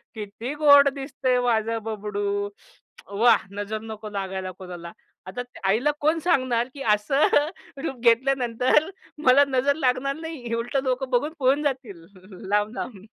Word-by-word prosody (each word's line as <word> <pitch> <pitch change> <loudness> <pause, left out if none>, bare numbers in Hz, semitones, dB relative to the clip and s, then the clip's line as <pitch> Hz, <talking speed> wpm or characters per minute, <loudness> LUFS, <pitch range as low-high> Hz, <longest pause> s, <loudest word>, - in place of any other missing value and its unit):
किती 220 +5 -6
गोड 285 -1 +7
दिसतंय 265 -2 -1
माझं 230 -2 0
बबडू. 205 -2 -3 0.7
वाह! 235 +2 +4
नजर 215 +1 -4
नको 220 -1 -8
लागायला 190 -2 -4
कोणाला." 180 -2 -9 0.4
आता 190 +7 -5 0.3
आईला 240 +9 +2
कोण 310 +3 +2
सांगणार 255 -8 +1
की 280 - -10
असं 270 +8 +2 0.6
रूप 270 - -3
घेतल्यानंतर 250 +4 +2 0.3
मला 265 +1 +6
नजर 275 +1 +1
लागणार 270 -1 0
नाही 310 -7 -6
उलटं 240 +4 -2
लोकं 260 0 -1
बघून 275 +5 0
पळून 275 +3 +2
जातील 250 - -4 0.4
लांब-लांब. 210 0 -2
245 Hz, 130 wpm, -24 LUFS, 210-275 Hz, 0.7 s, गोड